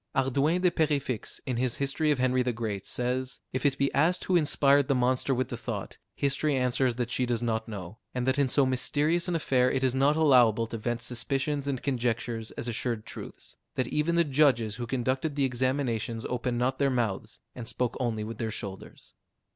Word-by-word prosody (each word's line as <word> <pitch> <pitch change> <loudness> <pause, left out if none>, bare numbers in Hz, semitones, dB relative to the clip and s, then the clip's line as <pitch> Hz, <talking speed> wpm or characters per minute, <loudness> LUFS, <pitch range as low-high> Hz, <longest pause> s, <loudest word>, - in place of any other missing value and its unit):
Hardouin 140 +6 +2
de 180 - +5
Perefixe, 145 -8 -1
in 125 -3 -2
his 125 -1 0
"History 140 +3 0
of 150 - +3
Henry 130 0 +2
the 125 0 0
Great," 110 -4 -4
says, 125 +1 -2
"If 130 +3 +2
it 135 -1 0
be 140 0 +1
asked 165 +6 +2
who 185 - +1
inspired 145 -4 +4
the 140 - +2
monster 130 +2 +1
with 130 -1 0
the 120 - -4
thought, 115 -4 -5 0.2
history 140 +1 +1
answers 125 -1 +1
that 120 0 -2
she 125 0 0
does 120 -1 -1
not 110 -1 -1
know; 100 0 -7
and 125 -1 -2
that 130 +2 +2
in 140 -2 +3
so 140 +2 +3
mysterious 145 +7 +1
an 175 - 0
affair, 130 -5 +2
it 130 - -1
is 130 -2 +2
not 135 +3 +3
allowable 125 -8 +5
to 115 0 -5
vent 120 +1 -2
suspicions 135 +3 -1
and 135 -3 -2
conjectures 120 -3 -1
as - - -3
assured 115 -1 -2
truths; - - -9 0.2
that 125 -2 -1
even 155 +3 +1
the 170 - +5
judges 130 -7 +2
who 120 -1 -4
conducted 130 +4 -1
the 140 -2 +2
examinations 125 -3 -1
opened 125 0 -2
not 125 +2 0
their 140 -1 +3
mouths, 115 -7 -2
and 120 -2 -8
spoke 125 0 -1
only 115 -4 -1
with 110 0 -7
their 115 - -1
shoulders." 100 -3 -8
130 Hz, 205 wpm, -28 LUFS, 120-140 Hz, 0.2 s, de